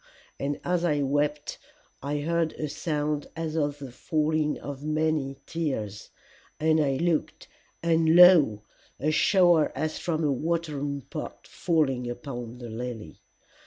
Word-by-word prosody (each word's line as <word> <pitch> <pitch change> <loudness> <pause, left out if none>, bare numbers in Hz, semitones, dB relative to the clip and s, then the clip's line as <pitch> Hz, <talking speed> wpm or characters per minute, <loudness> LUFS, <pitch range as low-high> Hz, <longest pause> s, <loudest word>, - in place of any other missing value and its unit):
And 140 +1 -2
as 175 -1 0
I 150 -4 +1
wept 145 +2 -1 0.4
I 145 +1 -2
heard 165 +1 0
a 155 - -4
sound 150 -1 -2
as 160 -1 -4
of 145 -2 0
the 135 -3 -8
falling 155 +3 0
of 140 -1 -7
many 155 -3 0
tears, 130 -12 -4 0.5
and 160 0 +3
I 135 -2 +1
looked, 165 +2 -1 0.4
and 165 -1 +3
lo 165 - +7 0.4
a 155 +4 +1
shower 175 -1 +4
as 155 0 -2
from 165 -2 -1
a 145 - +2
watering 145 -1 -2
pot - - -8
falling 135 -7 0
upon 120 -1 -6
the 120 -1 -8
lily! 115 -1 -7
150 Hz, 135 wpm, -27 LUFS, 135-160 Hz, 0.5 s, lo